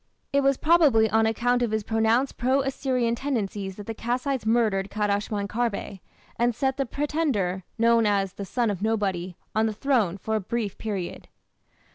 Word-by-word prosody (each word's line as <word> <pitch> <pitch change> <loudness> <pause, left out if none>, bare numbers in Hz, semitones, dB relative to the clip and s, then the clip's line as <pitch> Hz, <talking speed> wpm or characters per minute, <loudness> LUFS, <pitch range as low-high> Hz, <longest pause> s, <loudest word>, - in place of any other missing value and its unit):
It 280 - +4
was 275 -1 +3
probably 300 -9 +4
on 220 0 +3
account 245 +2 +1
of 240 - +1
his 220 0 -1
pronounced 225 +5 +1
pro 260 +3 +2
Assyrian 260 -3 0
tendencies 205 -7 -3
that 205 - -9
the 225 - -4
Kassites 245 +2 -2
murdered 215 -4 +2
Kadashman 205 0 -1
Kharbe, 215 -3 -2 0.4
and 240 0 +1
set 265 +2 0
the 275 -2 -1
pretender, 245 - -1
known 230 -1 +4
as 195 -2 +1
"the 200 - -6
son 235 +2 0
of 195 -2 -5
nobody", 195 -5 -1 0.2
on 220 +1 +2
the 220 - -2
throne 220 -6 +1
for 220 +3 -4
a - - +2
brief 210 0 -3
period. 200 -5 -4
225 Hz, 170 wpm, -25 LUFS, 205-250 Hz, 0.4 s, It